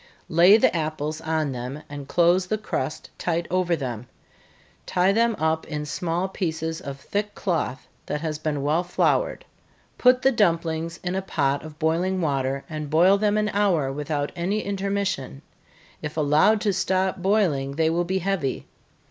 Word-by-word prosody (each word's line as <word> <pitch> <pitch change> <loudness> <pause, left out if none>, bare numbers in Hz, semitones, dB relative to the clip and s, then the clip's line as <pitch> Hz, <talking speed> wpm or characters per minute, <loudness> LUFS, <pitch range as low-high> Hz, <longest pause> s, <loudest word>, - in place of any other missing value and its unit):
Lay 175 +6 +7
the 220 - +3
apples 155 -1 -2
on 160 -3 -1
them, 130 +4 -6
and 145 -1 -8
close 175 +3 +3
the 215 - 0
crust 155 -9 -4
tight 170 0 -1
over 180 -2 +2
them 125 -5 -5 0.8
tie 185 +1 +3
them 230 +2 +2
up 160 0 0
in 150 -1 -4
small 170 +4 -2
pieces 160 -3 -3
of 140 -3 -7
thick 205 +7 -3
cloth, 160 -9 -2 0.2
that 150 - -2
has 155 -2 -3
been 150 -3 -2
well 155 +5 +2
floured 175 - 0 0.5
put 250 0 +5
the 270 - +5
dumplings 165 -6 0
in 180 0 -2
a 190 - -1
pot 140 -6 0
of 155 -1 -10
boiling 170 +4 0
water, 140 -4 -1
and 155 -2 -5
boil 175 +6 +5
them 210 0 +2
an 210 0 +1
hour 180 -10 +1
without 145 0 -2
any 190 +5 -1
intermission 195 - -2 0.6
if 150 +1 -6
allowed 155 +8 +4
to 205 -3 +1
stop 190 0 0
boiling, 175 -8 +1
they 160 +1 +2
will 170 +1 +1
be 185 +2 -1
heavy. 185 -7 -2
165 Hz, 165 wpm, -24 LUFS, 150-190 Hz, 0.8 s, Lay